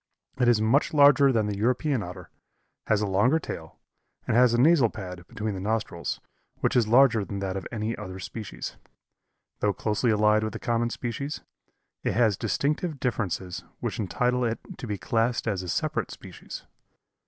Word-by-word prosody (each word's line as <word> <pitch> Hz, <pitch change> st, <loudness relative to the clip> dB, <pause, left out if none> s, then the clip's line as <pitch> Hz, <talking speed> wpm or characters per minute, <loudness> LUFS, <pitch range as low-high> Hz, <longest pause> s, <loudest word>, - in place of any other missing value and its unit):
It 125 Hz, -, +3 dB
is 120 Hz, -3 st, +5 dB
much 125 Hz, +8 st, +2 dB
larger 140 Hz, -1 st, +7 dB
than 110 Hz, -4 st, +2 dB
the 105 Hz, -1 st, -2 dB
European 125 Hz, +3 st, +1 dB
Otter, 90 Hz, -2 st, -8 dB, 0.6 s
has 110 Hz, -1 st, +2 dB
a -, -, +1 dB
longer 105 Hz, +10 st, +3 dB
tail, 80 Hz, -, -7 dB, 0.5 s
and -, -, 0 dB
has 125 Hz, 0 st, +6 dB
a 120 Hz, -, +2 dB
nasal 140 Hz, -3 st, +5 dB
pad 90 Hz, -4 st, -8 dB
between 110 Hz, -1 st, -3 dB
the 95 Hz, -, -5 dB
nostrils 100 Hz, -4 st, -2 dB, 0.4 s
which -, -, +1 dB
is 120 Hz, -3 st, +4 dB
larger 120 Hz, -2 st, +5 dB
than 100 Hz, 0 st, -5 dB
that 95 Hz, -1 st, -3 dB
of 95 Hz, -, -4 dB
any 110 Hz, 0 st, -2 dB
other 95 Hz, 0 st, -7 dB
species. 105 Hz, +2 st, -7 dB, 0.8 s
Though 105 Hz, -1 st, +1 dB
closely 105 Hz, +5 st, 0 dB
allied 105 Hz, 0 st, +4 dB
to 110 Hz, -, -1 dB
the -, -, -6 dB
common 120 Hz, 0 st, 0 dB
species, 125 Hz, +5 st, -4 dB, 0.6 s
it -, -, 0 dB
has 115 Hz, -4 st, +4 dB
distinctive 145 Hz, -, -1 dB
differences 95 Hz, -7 st, -2 dB, 0.2 s
which -, -, -3 dB
entitle 125 Hz, +5 st, 0 dB
it 115 Hz, -1 st, 0 dB, 0.2 s
to 125 Hz, -, -6 dB
be 105 Hz, -2 st, -2 dB
classed 115 Hz, +7 st, 0 dB
as 100 Hz, -4 st, 0 dB
a 90 Hz, -, -6 dB
separate -, -, -1 dB
species. -, -, -9 dB
110 Hz, 175 wpm, -27 LUFS, 100-125 Hz, 0.8 s, larger